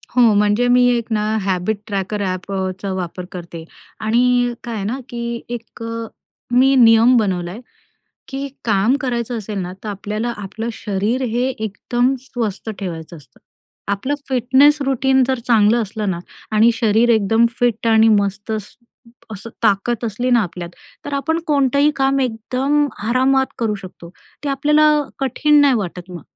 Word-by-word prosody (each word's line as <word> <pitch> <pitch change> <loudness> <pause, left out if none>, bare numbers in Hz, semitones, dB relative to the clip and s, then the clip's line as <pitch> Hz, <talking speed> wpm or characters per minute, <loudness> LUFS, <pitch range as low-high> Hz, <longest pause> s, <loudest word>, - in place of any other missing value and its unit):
हो, 250 - +5
म्हणजे 210 +4 +2
मी 245 0 +5
1 235 - -3
ना 210 - +1 0.2
हॅबिट 190 +2 -1
ट्रॅकर 205 0 -3
ॲप 185 0 -3
अ, 190 -1 -1
चा 200 - -3
वापर 180 -1 -5
करते. 170 -2 -8 0.4
आणि 245 +2 +2
काय 235 -1 -5
आहे 205 - -3
ना, 240 +6 -2
की 235 0 -4
1 235 -1 -7
अ, 230 0 -4 0.5
मी 260 +3 +4
नियम 230 0 +6
बनवलाय, 185 -2 -1 0.7
की 275 +1 -4 0.2
काम 215 +4 +2
करायचं 240 -3 -2
असेल 210 -1 -5
ना, 180 -1 -4
तर - - -4
आपल्याला 210 +3 -3
आपलं 210 +3 -6
शरीर 215 +4 -2
हे 240 +3 0
एकदम 240 +3 -1
स्वस्थ 230 -5 -4
ठेवायचं 170 -3 -6
असतं. 140 -5 -19 0.5
आपलं 260 +9 -2
फिटनेस 265 +4 +4
रूटीन 265 0 +2
जर 260 0 0
चांगलं 230 0 +4
असलं 215 -1 -3
ना 175 - -3 0.4
आणि 225 +2 +6
शरीर 225 +1 +2
एकदम 225 +1 +3
फिट 235 -2 0
आणि 225 0 +5
मस्त 200 +2 -3
स्स 215 -2 -6 0.6
असं 215 +3 -8
ताकद 220 +2 +1
असली 235 +3 -2
ना 240 -1 +5
आपल्यात, 175 -2 -6 0.3
तर 290 - -6
आपण 320 +4 0
कोणतंही 280 0 +3
काम 270 0 +2
एकदम 260 +5 0 0.2
आरामात 265 +2 +3
करू 225 -3 0
शकतो. 185 -3 -11 0.3
ते - - -1
आपल्याला 300 +2 +3 0.2
कठीण 295 +3 +3
नाही 280 -2 +5
वाटत 180 -4 -4
मग 175 -4 -8
230 Hz, 155 wpm, -19 LUFS, 200-255 Hz, 0.7 s, नियम